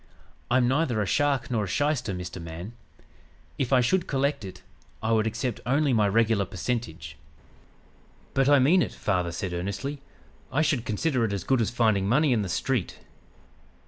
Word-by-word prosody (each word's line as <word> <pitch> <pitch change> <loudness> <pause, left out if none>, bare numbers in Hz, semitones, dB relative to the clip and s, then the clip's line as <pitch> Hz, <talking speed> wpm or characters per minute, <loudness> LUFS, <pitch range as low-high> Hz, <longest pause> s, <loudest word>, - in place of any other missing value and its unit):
I'm 125 0 +3
neither 130 -3 +1
a 105 - +1
shark 140 - +1
nor 110 -4 0
a - - -6
shyster, 145 -2 0
Mr. 90 -1 -6
Man. 85 +6 -8 0.9
If 130 - -1
I 130 -2 +5
should 175 +9 +1
collect 140 -2 0
it, 95 -2 -9 0.4
I 110 - 0
would 110 -1 +2
accept 115 +1 -3
only 140 +3 +2
my 105 -3 +3
regular 110 -1 +2
percentage.' 90 -7 -4 1.2
"'But 135 +1 +3
I 145 - +7
mean 155 +8 +4
it,' - - -2
father 90 -4 -1
said 90 +1 -4
earnestly. 100 +11 -4 0.5
'I 145 +4 +2
should 135 -6 0
consider 130 +3 0
it 105 -3 0
as 100 -3 -3
good 130 +3 +2
as 110 - +1
finding 110 -5 +1
money 145 +3 +3
in 110 - +1
the 95 - -3
street.' 120 +2 -1
115 Hz, 175 wpm, -26 LUFS, 100-135 Hz, 1.2 s, I